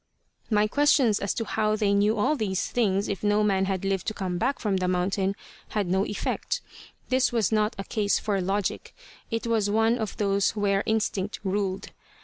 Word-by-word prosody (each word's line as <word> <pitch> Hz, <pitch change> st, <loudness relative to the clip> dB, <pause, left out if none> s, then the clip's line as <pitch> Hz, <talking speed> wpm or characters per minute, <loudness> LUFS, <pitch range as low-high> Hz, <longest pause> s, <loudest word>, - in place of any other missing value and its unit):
My 210 Hz, -2 st, +3 dB
questions 265 Hz, -3 st, +3 dB
as 200 Hz, -, -1 dB
to 225 Hz, -, -2 dB
how 215 Hz, 0 st, 0 dB
they 205 Hz, -2 st, +1 dB
knew 205 Hz, +2 st, +2 dB
all 215 Hz, +9 st, +2 dB
these 200 Hz, -7 st, -1 dB
things 200 Hz, -4 st, 0 dB
if 195 Hz, -3 st, -3 dB
no 210 Hz, 0 st, +3 dB
man 195 Hz, -2 st, +2 dB
had 190 Hz, -1 st, -2 dB
lived 195 Hz, -2 st, -1 dB
to 215 Hz, -, -2 dB
come 180 Hz, -3 st, -3 dB
back 265 Hz, +5 st, 0 dB
from 200 Hz, -3 st, 0 dB
the 185 Hz, -1 st, -1 dB
mountain 190 Hz, +2 st, 0 dB, 0.3 s
had 210 Hz, -2 st, -1 dB
no 190 Hz, +3 st, +1 dB
effect. 205 Hz, -, -2 dB, 0.5 s
This 260 Hz, 0 st, +2 dB
was 230 Hz, -4 st, +1 dB
not 215 Hz, 0 st, +1 dB
a 195 Hz, -, -4 dB
case 205 Hz, 0 st, 0 dB
for 200 Hz, -3 st, -1 dB
logic; 195 Hz, +2 st, -2 dB, 0.3 s
it 225 Hz, +1 st, -2 dB
was 225 Hz, -3 st, +1 dB
one 225 Hz, +3 st, +2 dB
of 220 Hz, -2 st, -4 dB
those 200 Hz, -2 st, +1 dB
where 200 Hz, -2 st, +1 dB
instinct 210 Hz, -2 st, -1 dB
ruled. 195 Hz, -1 st, -2 dB
205 Hz, 190 wpm, -26 LUFS, 195-220 Hz, 0.5 s, My